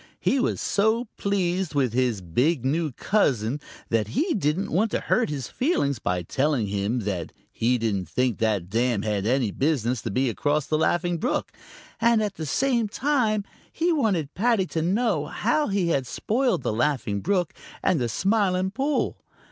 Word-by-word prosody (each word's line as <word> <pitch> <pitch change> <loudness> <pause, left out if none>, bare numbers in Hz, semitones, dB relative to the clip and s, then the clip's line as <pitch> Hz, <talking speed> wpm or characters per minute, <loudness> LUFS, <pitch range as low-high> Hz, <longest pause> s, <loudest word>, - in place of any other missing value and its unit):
He 275 - +1
was - - 0
so 220 +3 +1
pleased 185 -4 -1
with 130 -5 +1
his 125 -5 +1
big 125 - 0
new 155 +3 0
cousin 135 - +1 0.3
that 110 -3 +1
he 330 - 0
didn't 180 0 0
want 210 +7 +2
to - - -1
hurt 245 - +1
his 140 -6 -4
feelings 145 - 0
by 90 -4 -1
telling 135 - 0
him 100 +4 -1
that 95 -5 -3 0.2
he 125 +2 +1
didn't 105 -5 -2
think 125 -4 0
that 105 -6 0
dam 115 0 0
had 105 -1 -1
any 125 -3 +1
business 130 -3 0
to - - -4
be 130 +6 +1
across 145 +5 0
the 155 - 0
Laughing 175 +1 +1
Brook, 250 - -1 0.5
and 230 -1 +3
at 205 -2 -2
the 160 -4 -6
same 240 - +1
time 230 -3 +1 0.3
he 340 +2 +1
wanted 195 - 0
Paddy 225 -2 +2
to 160 - 0
know 185 -3 +1
how 240 - 0
he 195 -4 0
had 135 -6 0
spoiled 240 - 0
the - - 0
Laughing 115 -5 0
Brook 180 -3 0 0.3
and 160 - +2
the 120 - 0
Smiling 190 - +1
Pool. 275 +6 -1
155 Hz, 170 wpm, -25 LUFS, -, 0.5 s, and